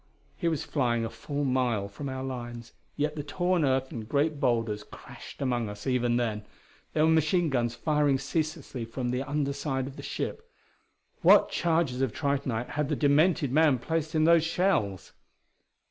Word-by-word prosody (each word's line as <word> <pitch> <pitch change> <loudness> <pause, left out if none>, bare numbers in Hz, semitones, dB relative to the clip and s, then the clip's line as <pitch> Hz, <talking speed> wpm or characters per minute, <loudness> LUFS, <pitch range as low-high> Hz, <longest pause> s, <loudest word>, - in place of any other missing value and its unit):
He 170 - -2
was 160 -4 0
flying 120 -5 0
a 115 - -5
full 140 +5 -4
mile 125 -6 +1
from 135 +8 -6
our 130 0 -4
lines, 120 -3 -6 0.2
yet 150 +1 0
the 150 - -3
torn 175 +4 0
earth 130 -1 +1
and 110 -2 -7
great 145 +1 +1
boulders 115 -5 0
crashed - - -10
among 120 -4 0
us 105 - -9
even 125 -2 +1
then. 110 -3 -1 0.5
There 155 0 +3
were 160 - +4
machine 160 +2 +2
guns 120 -2 0
firing 150 -2 +2
ceaselessly 145 -2 -3
from 120 +2 -4
the 125 +1 -1
under 140 0 -1
side 135 -2 -2
of 135 +1 -9
the - - -7
ship. 460 +1 -5 0.7
What - - +6
charges 160 -7 +1
of 130 -5 0
tritonite 135 -5 -1
had 150 -1 -2
the 150 - +1
demented 150 +1 +3
man 150 -2 +4
placed 160 +5 -2
in 155 - +3
those 165 0 +5
shells? 165 - 0
135 Hz, 175 wpm, -28 LUFS, 120-155 Hz, 0.7 s, What